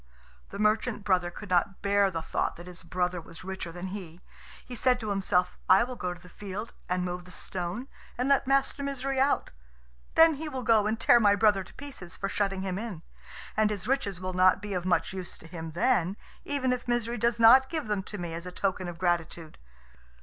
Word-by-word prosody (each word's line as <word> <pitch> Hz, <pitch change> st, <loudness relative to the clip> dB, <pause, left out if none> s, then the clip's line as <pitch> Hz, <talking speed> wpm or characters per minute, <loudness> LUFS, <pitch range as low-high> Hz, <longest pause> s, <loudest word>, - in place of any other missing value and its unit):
The -, -, -7 dB
merchant 215 Hz, +1 st, +1 dB
brother 180 Hz, -3 st, +2 dB
could 190 Hz, +2 st, -10 dB
not 190 Hz, +2 st, +1 dB
bear 200 Hz, 0 st, +3 dB
the 165 Hz, -3 st, -4 dB
thought -, -, -1 dB
that 175 Hz, -, -11 dB
his 180 Hz, 0 st, -10 dB
brother 180 Hz, 0 st, -1 dB
was 165 Hz, +1 st, -11 dB
richer 190 Hz, -2 st, -5 dB
than 175 Hz, +2 st, -6 dB
he. 180 Hz, -4 st, -8 dB, 0.5 s
He 250 Hz, -, -7 dB
said 250 Hz, +1 st, +2 dB
to 215 Hz, -3 st, -3 dB
himself, 180 Hz, -2 st, +1 dB
"I 190 Hz, +4 st, +7 dB
will 250 Hz, +1 st, -5 dB
go 180 Hz, -6 st, -3 dB
to 175 Hz, -, -8 dB
the 180 Hz, -, -15 dB
field, 205 Hz, +4 st, -7 dB, 0.2 s
and 180 Hz, 0 st, 0 dB
move 180 Hz, 0 st, -4 dB
the -, -, -13 dB
stone, 180 Hz, +6 st, -4 dB, 0.3 s
and 250 Hz, +2 st, 0 dB
let 275 Hz, -2 st, +3 dB
Master 275 Hz, +1 st, +2 dB
Misery 275 Hz, -1 st, -2 dB
out. 275 Hz, +2 st, +2 dB, 0.6 s
Then 325 Hz, 0 st, +7 dB
he 310 Hz, +1 st, -5 dB
will 260 Hz, -3 st, -4 dB
go 220 Hz, -3 st, +4 dB
and 220 Hz, +1 st, -1 dB
tear 240 Hz, -, +6 dB
my 205 Hz, -3 st, +5 dB
brother 205 Hz, -2 st, +3 dB
to -, -, -16 dB
pieces 270 Hz, -12 st, -9 dB
for 195 Hz, -, -2 dB
shutting 195 Hz, -2 st, -1 dB
him 190 Hz, 0 st, -2 dB
in; 205 Hz, -8 st, -6 dB, 0.5 s
and 215 Hz, 0 st, +3 dB
his 205 Hz, -2 st, -4 dB
riches 225 Hz, -9 st, 0 dB
will 185 Hz, 0 st, -4 dB
not 185 Hz, 0 st, +5 dB
be 205 Hz, 0 st, -5 dB
of 180 Hz, -1 st, -2 dB
much 185 Hz, +1 st, +1 dB
use 185 Hz, -2 st, -6 dB
to -, -, -15 dB
him 165 Hz, -1 st, -7 dB
then, 190 Hz, -1 st, +1 dB, 0.3 s
even 265 Hz, -3 st, 0 dB
if 250 Hz, 0 st, -5 dB
Misery 240 Hz, -1 st, 0 dB
does 235 Hz, 0 st, +1 dB
not 255 Hz, +4 st, +7 dB
give 320 Hz, -2 st, -2 dB
them 210 Hz, -2 st, -1 dB
to 210 Hz, +2 st, -7 dB
me 175 Hz, -3 st, -5 dB
as 170 Hz, +2 st, -6 dB
a -, -, -6 dB
token 185 Hz, -1 st, -1 dB
of 175 Hz, -1 st, -6 dB
gratitude. 170 Hz, -2 st, -2 dB
195 Hz, 220 wpm, -28 LUFS, 180-235 Hz, 0.6 s, I